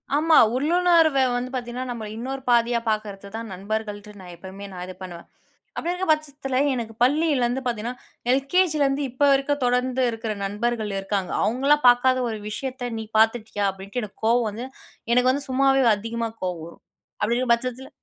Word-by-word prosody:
ஆமா, 315 Hz, +2 st, +4 dB, 0.2 s
உள்ளுணர்வ 330 Hz, +1 st, +3 dB, 0.2 s
வந்து 245 Hz, +1 st, -2 dB
பாத்தீங்கன்னா, 250 Hz, 0 st, -4 dB
நம்மள 225 Hz, -3 st, -5 dB
இன்னொரு 265 Hz, +3 st, -5 dB
பாதியா 235 Hz, 0 st, +3 dB
பாக்குறது 205 Hz, -2 st, -3 dB
தான் 225 Hz, -2 st, -6 dB
நண்பர்கள்ட்டு, 210 Hz, +2 st, -5 dB
நான் 180 Hz, -2 st, -10 dB
எப்பவுமே 190 Hz, +3 st, -10 dB
நான் 180 Hz, -1 st, -6 dB
இது 185 Hz, -, -8 dB
பண்ணுவேன். 175 Hz, -2 st, -9 dB, 0.5 s
அப்டி 340 Hz, -, -2 dB
இருக்குற 360 Hz, +1 st, -3 dB
பட்சத்துல 285 Hz, -4 st, -1 dB, 0.2 s
எனக்கு 230 Hz, -3 st, -4 dB
பள்ளிலருந்து 265 Hz, -3 st, +2 dB
பாத்திங்கன்னா 240 Hz, +1 st, -3 dB, 0.3 s
எல்.கே.ஜிலருந்து 285 Hz, 0 st, +2 dB
இப்போ 255 Hz, +4 st, +1 dB
வரைக்கும் 275 Hz, +1 st, +1 dB
தொடர்ந்து 250 Hz, +1 st, +1 dB
இருக்குற 225 Hz, -1 st, -4 dB
நண்பர்கள் 215 Hz, +1 st, -2 dB
இருக்காங்க, 195 Hz, -2 st, -2 dB
அவங்கலாம் 275 Hz, +5 st, +2 dB
பாக்காத 255 Hz, +1 st, +4 dB
ஒரு 220 Hz, -, -4 dB
விஷயத்த 255 Hz, +2 st, -4 dB
"நீ -, -, -4 dB, 0.2 s
பாத்துட்டியா?" 220 Hz, -2 st, +1 dB
அப்டின்ட்டு 195 Hz, +5 st, -6 dB
எனக்கு 210 Hz, 0 st, -11 dB
கோவம் 235 Hz, 0 st, +3 dB
வந்து, 225 Hz, +4 st, -6 dB, 0.5 s
எனக்கு 250 Hz, +1 st, +4 dB
வந்து 280 Hz, +1 st, -3 dB
சும்மாவே 270 Hz, +1 st, +3 dB
அதிகமா 230 Hz, +2 st, -3 dB
கோவம் 175 Hz, -3 st, -3 dB
வரும். 170 Hz, -, -15 dB, 0.4 s
அப்டிங்குற 240 Hz, +4 st, +1 dB
பட்சத்துல 255 Hz, +2 st, -6 dB
245 Hz, 155 wpm, -24 LUFS, 215-270 Hz, 0.5 s, ஆமா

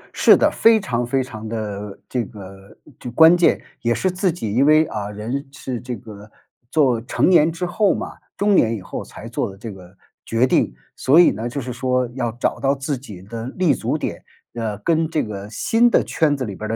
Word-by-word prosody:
是 -, -, +6 dB
的， -, -, +3 dB
非 225 Hz, -1 st, +4 dB
常 120 Hz, -, -2 dB
非 130 Hz, +2 st, 0 dB
常 110 Hz, -3 st, -8 dB
地 105 Hz, -3 st, -5 dB
这 125 Hz, -2 st, -1 dB
个 100 Hz, -2 st, -12 dB, 0.2 s
就 125 Hz, -, -6 dB
关 160 Hz, +7 st, +7 dB
键 175 Hz, -1 st, +3 dB, 0.2 s
也 120 Hz, 0 st, +1 dB
是 185 Hz, -, 0 dB
自 185 Hz, 0 st, 0 dB
己， 110 Hz, -12 st, -4 dB
因 130 Hz, -, +3 dB
为， 155 Hz, +1 st, +5 dB
啊， 105 Hz, -7 st, -5 dB
人 115 Hz, +7 st, -5 dB
是 130 Hz, -3 st, -6 dB
这 125 Hz, -1 st, -5 dB
个， 105 Hz, -3 st, -12 dB, 0.4 s
做 130 Hz, -7 st, +2 dB
成 120 Hz, -, 0 dB
年 165 Hz, -3 st, +5 dB
之 170 Hz, +2 st, -4 dB
后 195 Hz, +4 st, +1 dB
嘛 -, -, -6 dB, 0.2 s
中 205 Hz, -1 st, +3 dB
年 115 Hz, -6 st, +3 dB
以 105 Hz, -, -7 dB
后 -, -, -6 dB
才 -, -, -11 dB
做 -, -, -2 dB
的 95 Hz, -, -14 dB
这 110 Hz, +2 st, -7 dB
个 95 Hz, 0 st, -15 dB, 0.3 s
决 115 Hz, +2 st, +1 dB
定。 -, -, +2 dB, 0.2 s
所 140 Hz, +6 st, +4 dB
以 175 Hz, -, +7 dB
呢， 110 Hz, +4 st, -4 dB
就 140 Hz, -, -4 dB
是 125 Hz, -1 st, -5 dB
说 125 Hz, +1 st, 0 dB
要 120 Hz, -3 st, -2 dB
找 120 Hz, -, -2 dB
到 140 Hz, 0 st, +1 dB
自 140 Hz, +1 st, -3 dB
己 105 Hz, -8 st, -11 dB
的 115 Hz, +3 st, -7 dB
立 180 Hz, -6 st, +3 dB
足 -, -, -2 dB
点， -, -, -5 dB, 0.3 s
呃， 110 Hz, -3 st, -3 dB
跟 160 Hz, +7 st, +1 dB
这 155 Hz, -2 st, 0 dB
个 100 Hz, -1 st, -7 dB
新 225 Hz, -, +2 dB
的 -, -, +3 dB
圈 150 Hz, -3 st, +1 dB
子 130 Hz, -, -3 dB
里 100 Hz, -4 st, -6 dB
边 110 Hz, -, -6 dB
儿 -, -, -1 dB
125 Hz, 235 characters per minute, -21 LUFS, 110-155 Hz, 0.4 s, 关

